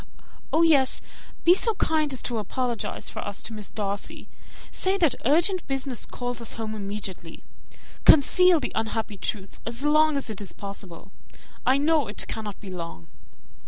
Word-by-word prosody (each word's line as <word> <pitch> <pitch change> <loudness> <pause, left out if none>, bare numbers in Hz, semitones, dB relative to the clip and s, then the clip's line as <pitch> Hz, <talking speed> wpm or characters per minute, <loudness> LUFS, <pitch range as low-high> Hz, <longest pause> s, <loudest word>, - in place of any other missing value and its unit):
"Oh, 325 - +4
yes! 280 -5 +4 0.4
Be 345 - +7
so 445 +4 +2
kind 310 -4 +1
as 260 - -2
to 235 -2 -2
apologize 240 +2 -3
for - - -6
us 205 -1 -4
to 225 - -5
Miss 210 -2 -5
Darcy. 200 -2 -4 0.4
Say 380 +1 +1
that 330 -8 +3
urgent 345 - +2
business 270 -3 -2
calls 245 -1 -4
us 230 - +1
home 220 -1 -4
immediately. 200 -5 -6 0.6
Conceal 350 +4 +7
the 260 - -3
unhappy 220 -1 -2
truth 195 0 -4
as 235 +5 -2
long 305 0 +4
as 275 - -2
it 210 - -5
is 200 - -7
possible. 195 -4 -8 0.6
I 260 +1 +5
know 300 -2 +2
it 205 - -2
cannot 210 -3 -6
be 195 -3 -9
long." 165 - -7
240 Hz, 160 wpm, -26 LUFS, 205-305 Hz, 0.6 s, Be